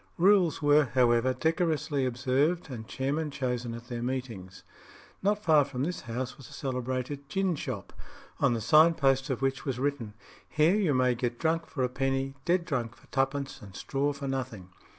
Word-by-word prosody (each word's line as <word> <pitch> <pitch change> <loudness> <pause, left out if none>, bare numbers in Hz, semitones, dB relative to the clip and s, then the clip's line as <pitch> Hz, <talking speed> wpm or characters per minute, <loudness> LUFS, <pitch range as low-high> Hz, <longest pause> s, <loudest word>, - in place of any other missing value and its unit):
Rules 180 -4 +4
were, 145 0 +5
however, 120 0 +4
decorously 160 -3 0
observed, 135 +7 0
and 110 -3 -7
chairmen 145 +4 -2
chosen 125 -4 -3
at 115 0 -9
their 120 -2 -4
meetings. 120 -7 -5 0.6
Not 205 +2 +1
far 155 -5 +5
from 135 -2 -4
this 175 +4 -3
house 125 +3 -5
was 130 - -12
a - - -13
celebrated 130 +1 -4
gin 190 +1 0
shop, 125 -9 -6 0.5
on 120 - +3
the 115 - -3
sign 155 +8 +6
post 135 -3 +2
of 135 0 -2
which 135 0 0
was 135 -4 -2
written, 130 -6 -2 0.3
"Here 155 +3 +3
you 190 -9 +2
may 125 -1 +3
get 120 0 -2
drunk 165 +2 0
for 135 - -3
a - - +3
penny, 135 +1 -1
dead 175 0 +2
drunk 125 -7 -2
for - - -22
twopence, 135 +1 -1
and 95 -3 -12
straw 140 +7 -1
for 140 -1 -6
nothing." 125 -9 -4
135 Hz, 180 wpm, -29 LUFS, 125-150 Hz, 0.6 s, sign